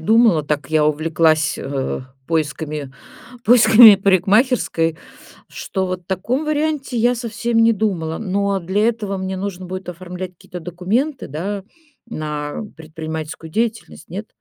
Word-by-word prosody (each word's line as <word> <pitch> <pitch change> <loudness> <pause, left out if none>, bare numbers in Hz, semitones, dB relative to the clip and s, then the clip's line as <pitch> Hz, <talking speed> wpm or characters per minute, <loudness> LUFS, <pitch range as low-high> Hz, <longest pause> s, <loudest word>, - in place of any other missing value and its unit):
думала, 220 -3 +4
так 145 -1 -2
я 155 -1 +3
увлеклась, 155 0 +2
э, 135 -1 -3 0.3
поисками 150 -3 -2 0.5
поисками 225 -2 +8
парикмахерской, 195 - +2 0.5
что 190 -1 -3
вот 185 0 -4
о - - -33
таком 220 - -2
варианте 300 -4 -1
я 240 +2 +3
совсем 235 0 -2
не 230 - +5
думала. 180 -7 -2
Но 200 -1 0
для 195 +6 +1
этого 210 -4 -2
мне 190 0 -4
нужно 190 -1 -5
будет 185 0 -6
оформлять 180 +1 -7
какие-то 180 +1 -10
документы, 200 - -2
да, 190 +7 -4 0.4
на 150 -3 -4
предпринимательскую 160 0 -7
деятельность, 225 -5 -3
нет? 200 +5 -6
185 Hz, 130 wpm, -20 LUFS, 160-220 Hz, 0.5 s, поисками